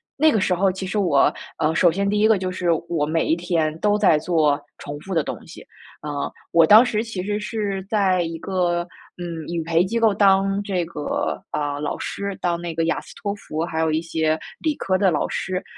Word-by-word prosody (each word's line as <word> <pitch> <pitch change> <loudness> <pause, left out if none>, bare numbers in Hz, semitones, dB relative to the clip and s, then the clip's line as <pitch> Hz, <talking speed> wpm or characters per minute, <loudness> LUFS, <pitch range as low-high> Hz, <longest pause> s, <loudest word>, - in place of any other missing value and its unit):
那 310 +2 +4
个 220 - +2
时 185 - +1
候 190 +2 +2
其 190 +1 -6
实 205 +3 -1
我， 165 -8 +3 0.2
呃， 160 0 +1
首 175 -1 +5
先 200 +4 -1
第 205 +1 +1
一 215 - +5
个 220 -2 +4
就 185 0 -3
是 180 -1 -2 0.2
我 165 -4 -1
每 160 +2 0
一 160 - +2
天 165 -3 -1
都 210 0 +2
在 190 -7 +4
做 150 -3 +1 0.2
重 145 0 -7
复 190 +5 -7
的 160 - +2
东 - - -4
西， - - -12 0.4
呃， 145 -1 -3 0.2
我 165 -1 +5
当 220 +4 +8
时 220 -3 -1
其 210 -6 -5
实 205 +1 -2
是 210 -2 -3
在 190 -4 +2
一 165 -1 -3
个， 175 -1 -1 0.3
嗯， 170 -3 -6
语 170 -1 -2
培 165 +1 +2
机 230 +4 -1
构 225 -2 +4
当 195 0 +3
这 190 -4 -1
个， 160 -3 -3
啊， 145 -1 -2
老 150 - -3
师， 200 -1 -4
当 170 -1 0
那 170 -1 -5
个 165 0 +1
雅 165 - 0
斯 - - -14
托 200 -1 -2
福， 160 -6 -5
还 165 -1 -3
有 160 - +2
一 160 +1 0
些 160 -1 0 0.2
理 310 -2 0
科 185 -7 0
的 190 0 +3
老 150 - 0
师。 185 0 -3
180 Hz, 245 characters per minute, -22 LUFS, 160-200 Hz, 0.4 s, 当